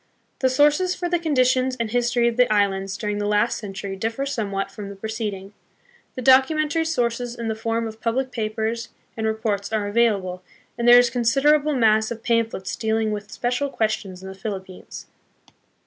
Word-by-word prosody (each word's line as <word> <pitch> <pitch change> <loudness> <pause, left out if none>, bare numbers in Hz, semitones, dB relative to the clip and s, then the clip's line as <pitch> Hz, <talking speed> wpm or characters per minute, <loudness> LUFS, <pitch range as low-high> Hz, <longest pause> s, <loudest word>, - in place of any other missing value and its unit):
The 260 - +2
sources 295 +7 +3
for 355 - -3
the 350 0 0
conditions 255 -4 +2
and 230 -2 -2
history 240 0 +2
of 235 - 0
the 250 -2 +3
islands 195 -2 +1
during 210 -1 -3
the 205 - -1
last 210 +3 +1
century 195 -1 -6
differ 225 +7 -2
somewhat 205 -8 -3
from 205 -2 -8
the 200 - -8
preced 220 +1 -3
ing. 195 +1 -10 0.6
The 255 - -5
documentary 305 +5 +4
sources 245 -5 -1
in 230 -2 -4
the - - 0
form 230 +1 -2
of 220 0 -8
public 255 +3 -1
papers 225 0 -3 0.3
and 220 -1 -2
reports 220 -2 -2
are 215 -2 0
available, 205 -4 +1 0.3
and 235 0 -1
there 240 0 +9
is 245 0 +5
a - - -16
consider 260 +5 +3
able 300 0 +1
mass 220 -3 +3
of 230 -1 -7
pamphlets 230 -5 -1
dealing 220 -1 0
with 205 -1 -5
special 250 +4 -1
questions 210 -6 -2
in - - -7
the 190 - -7
Philippines. 190 -2 -7
225 Hz, 185 wpm, -23 LUFS, 210-250 Hz, 0.6 s, there